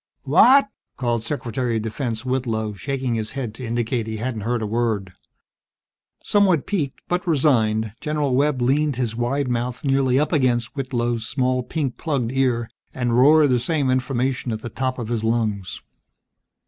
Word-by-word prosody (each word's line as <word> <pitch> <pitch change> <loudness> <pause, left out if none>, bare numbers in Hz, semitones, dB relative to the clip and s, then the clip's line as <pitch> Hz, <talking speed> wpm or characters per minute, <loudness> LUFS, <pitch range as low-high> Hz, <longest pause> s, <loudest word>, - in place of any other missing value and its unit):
"What?" 270 -1 +6 0.3
called 120 -3 -1
Secretary 125 -3 -2
of - - -1
Defense 115 +1 -3
Whitlow, 115 -5 -1
shaking 130 +3 -3
his 110 0 -3
head 130 -6 -4
to 125 - -9
indicate 115 0 -1
he 110 0 -4
hadn't 115 -1 -3
heard 115 +2 -1
a - - -1
word. 105 -4 -1 1.1
Somewhat 190 -7 +3
piqued, 155 -10 -2
but 180 +2 -1
resigned, 110 -9 +2
General 150 -3 -1
Webb 140 -2 +1
leaned 145 +3 +2
his 120 -3 -2
wide 130 +4 -1
mouth 125 0 -2
nearly 135 -2 +2
up 150 - 0
against 125 -5 +1
Whitlow's 120 -4 -2
small 130 -1 0
pink 135 0 -3
plugged 135 -8 -1
ear, 125 -3 +1 0.3
and 120 -2 0
roared 145 +3 +6
the 125 - +3
same 140 0 0
information 130 0 -1
at 110 0 -4
the 120 - -6
top 130 +2 -2
of 115 -3 -5
his 115 -2 -1
lungs. 110 -5 -1
125 Hz, 160 wpm, -22 LUFS, 115-135 Hz, 1.1 s, What